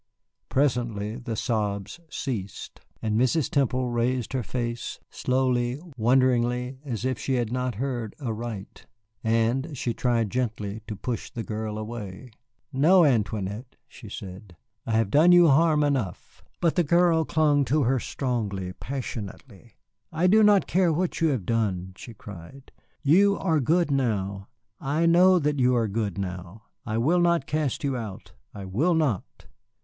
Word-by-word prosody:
Presently 120 -5 0
the 120 -3 -5
sobs 105 - -2
ceased, 110 -10 -5 0.2
and 110 -1 0
Mrs. 135 +3 +1
Temple 130 -3 +1
raised 120 +1 -1
her 130 - 0
face, 120 +1 -4
slowly, 125 0 0 0.2
wonderingly, 125 +1 +2
as 125 -4 -4
if 130 -3 -1
she 135 - -1
had 120 -3 -1
not 125 -1 -2
heard 120 -2 -3
aright. 115 -5 -6 0.4
And 120 +6 0
she 120 -1 -1
tried 115 -4 0
gently 110 -4 -3
to 110 - -4
push 115 +4 -4
the 115 -3 -5
girl 110 -1 -4
away. 110 +1 -7 0.4
"No, 165 +6 +5
Antoinette," 110 -2 -1
she - - -12
said, 95 0 -9 0.3
"I 115 - -1
have 110 -3 +1
done 160 +5 +6
you 175 -2 +7
harm 155 +1 +4
enough." 130 - -3 0.2
But 170 -2 +3
the 175 - +3
girl 170 0 +3
clung 150 -2 +2
to 145 +4 +2
her 130 +2 +2
strongly, 105 -9 -3
passionately. 115 -3 -7 0.4
"I 165 +3 0
do 210 +4 +6
not 205 -2 +5
care 180 -2 +2
what 175 +2 -1
you 165 - +4
have 130 - -1
done," 95 -4 -1
she 115 +3 -11
cried, 105 +7 -12 0.3
"you 200 +7 +4
are 165 -5 +1
good 165 +4 +2
now. 100 -7 -1 0.3
I 150 +5 0
know 180 +2 +6
that 150 -3 0
you 125 0 +3
are 115 -2 +1
good 105 -2 -2
now. 95 +2 -6 0.2
I 110 0 -1
will 155 +10 +3
not 170 -5 +2
cast 150 -1 -2
you 140 -2 0
out. 110 -6 -7 0.2
I 100 -2 -8
will 140 - +1
not." 145 - -1
125 Hz, 155 wpm, -26 LUFS, 110-145 Hz, 0.4 s, you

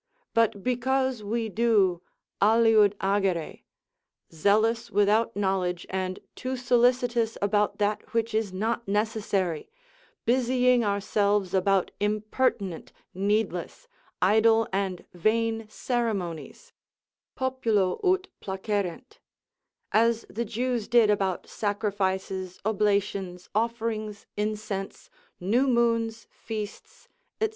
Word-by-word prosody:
But 225 -4 +2
because 260 0 0
we 225 +2 -1
do 205 -5 +2 0.4
aliud 215 -1 +5
agere, 195 -4 0 0.7
zealous 220 +7 +2
without 210 +3 +2
knowledge, 190 -3 -1
and 185 0 -2
too 255 +1 -4
solicitous 245 -2 +2
about 205 +1 +1
that 205 0 -1
which 230 -1 0
is 220 -3 0
not 225 +5 -2
necessary, 200 -5 -1 0.6
busying 250 0 +3
ourselves 200 -1 +1
about 195 0 +2
impertinent, 210 -3 -1 0.2
needless, 200 - -1 0.4
idle, 225 +3 +4
and 190 -2 -2
vain 225 +4 0
ceremonies, 215 -9 -3 0.6
populo 230 -8 0
ut 375 0 +2
placerent, 200 - -3 0.7
as 230 +1 +2
the 235 +2 -2
Jews 235 0 -2
did 230 -2 +5
about 195 -3 0
sacrifices, 190 -3 -2
oblations, 200 -4 0
offerings, 220 -2 -2
incense, 210 -2 -4 0.3
new 230 +9 +2
moons, 230 -2 +1
feasts, 220 - -8 0.3
&c. 440 - +1
215 Hz, 95 wpm, -27 LUFS, 195-230 Hz, 0.7 s, aliud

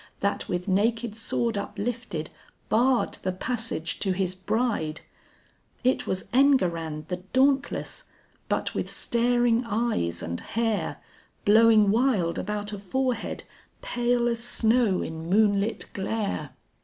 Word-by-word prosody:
That 200 0 -1
with 180 +1 -2
naked 220 +3 +1
sword 225 -1 -1
uplifted 205 -5 -4 0.4
barred 245 +2 +2
the 185 - -1
passage 220 -4 -2
to 190 -2 0
his 185 -1 -1
bride; 185 -4 -1 0.8
It 255 +1 +1
was 190 0 -2
Enguerrand 170 - +2
the 180 - -2 0.2
dauntless, 275 - +1 0.4
but - - -1
with - - -2
staring 240 0 +2
eyes 215 - -1
and 85 +1 -3
hair 225 -2 -1 0.5
Blowing 215 -1 +6
wild 220 -8 +2
about 210 +1 -3
a 205 - -5
forehead 250 +6 -2 0.4
pale 240 0 +1
as 235 -1 -1
snow 230 -4 +3
in 160 +1 -6
moonlit 205 +1 +2
glare. 205 +1 -2
220 Hz, 120 wpm, -26 LUFS, 185-240 Hz, 0.8 s, Blowing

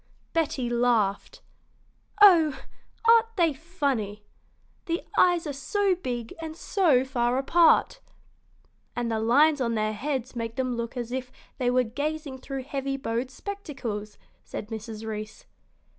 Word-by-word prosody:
Betty 290 -6 0
laughed. 235 -4 0 0.8
"Oh, 325 -8 +7 0.5
aren't 455 0 +5
they 335 -4 +3
funny! 270 - -3 0.6
The 335 +1 -1
eyes 350 -2 +4
are 295 - -3
so 390 +8 +1
big 245 -10 -4
and 320 0 -6
so 320 -11 +2
far 245 -2 0
apart." 335 - +4 1.0
"And 240 -1 -1
the 220 - 0
lines 285 +6 +4
on 235 -2 0
their 215 0 0
heads 260 +2 -3
make 230 -1 -4
them 255 -2 -1
look 235 +2 -4
as 240 -1 -4
if 255 0 -4 0.3
they 250 -1 +2
were 250 0 +3
gazing 285 +3 -4
through 270 0 -5
heavy 275 0 -3
bowed 245 -1 -2
spectacles," 260 - -6 0.3
said 210 - -7
Mrs. 220 0 -6
Reece. 215 0 -6
260 Hz, 135 wpm, -26 LUFS, 230-315 Hz, 1.0 s, Oh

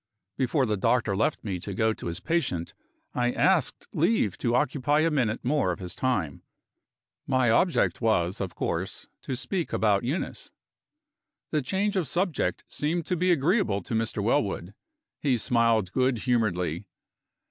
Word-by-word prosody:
Before 130 +1 +1
the 105 -3 0
doctor 110 0 +1
left 110 +9 0
me 95 -4 -3
to 100 +2 -6
go 110 +1 +2
to - - -7
his 85 - -3
patient, 150 - -1 0.4
I 120 0 +1
asked - - +2
leave 165 - +2
to 120 0 +1
occupy 145 +2 +2
a 165 +1 +2
minute 120 -8 0
more 135 -8 +2
of 85 - -3
his 90 -2 -7
time. 95 - -1 0.9
My 130 -3 +3
object 170 +5 +2
was, 100 -4 +1
of 95 -2 -4
course, - - -3
to 130 - -4
speak 145 +8 -3
about 105 -3 +2
Eunice. 140 +9 -3 1.0
The 155 - +1
change 200 +9 -1
of 180 -6 0
subject 175 +4 -1
seemed 160 +2 -2
to 180 - 0
be 180 +2 +2
agreeable 165 - +2
to - - -6
Mr. 110 -2 -1
Wellwood. 100 -3 0 0.5
He 135 -4 +2
smiled 115 -5 +2
good 130 -1 +2
humoredly. 100 -7 0
120 Hz, 155 wpm, -27 LUFS, 100-150 Hz, 1.0 s, My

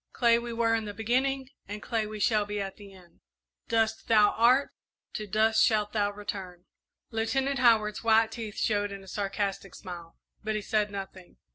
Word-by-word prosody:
"Clay 235 -2 +4
we 235 0 -6
were 230 0 +1
in 225 -1 0
the 205 -1 -6
beginning 260 +4 0 0.2
and 205 +1 -6
clay 225 -3 -1
we 215 0 -7
shall 210 0 +3
be 205 0 -4
at 195 -1 -5
the 200 -1 -12
end. 180 -3 -18 0.5
'Dust 225 -1 0
thou 210 -2 +5
art; 250 +5 +3 0.4
to 215 - -5
dust 220 +2 +3
shalt 210 -2 +2
thou 205 -2 +1
return.'" 190 -3 -7 0.5
Lieutenant 265 +4 0
Howard's 220 -4 +3
white 225 0 +4
teeth 225 -3 -7
showed 205 -1 0
in 195 -1 -8
a - - -15
sarcastic 195 -1 -3
smile, 170 -3 -9 0.3
but 215 0 -2
he 215 - -1
said 210 0 +1
nothing. 195 -2 -8
215 Hz, 180 wpm, -28 LUFS, 200-230 Hz, 0.5 s, thou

